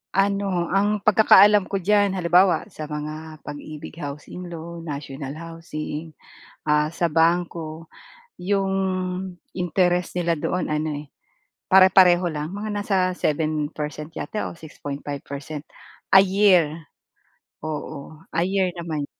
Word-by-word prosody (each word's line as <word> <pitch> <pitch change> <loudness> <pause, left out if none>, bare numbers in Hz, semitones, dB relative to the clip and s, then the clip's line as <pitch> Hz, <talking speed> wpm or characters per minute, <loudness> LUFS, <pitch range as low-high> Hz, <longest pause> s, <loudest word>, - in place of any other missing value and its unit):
Ano, 195 -3 +1
ang 205 +2 +1
pagkakaalam 210 -1 +6
ko 195 -2 -3
diyan, 205 0 +3
halimbawa, 180 +1 +4
sa 155 -3 -7
mga 155 +1 -6
Pag-IBIG 150 +2 -8
Housing 150 +5 -7
Loan, 170 0 -8
national 140 -1 -6
housing, 160 -1 -7 0.5
ah, 150 +1 +2
sa 170 0 0
bangko, 165 0 0 0.5
'yong 195 +1 0 0.8
interest 180 0 0
nila 170 -1 +1
doon 180 -2 -1
ano 150 +1 -1 0.2
eh, - - -20 0.6
pare-pareho 185 -2 +6
lang, 155 -2 -3
mga 205 +3 -5
nasa 205 -1 0 0.2
7% 150 -1 -2
yata 210 +5 -4
o 170 - -12
6.5% 145 -1 -7 0.5
a 190 - +9
year. 185 -5 +4 0.8
Oo, 155 0 -6 0.2
a 170 - +1
year 185 -1 +1
naman. 160 -4 -4
165 Hz, 115 wpm, -23 LUFS, 155-185 Hz, 0.8 s, a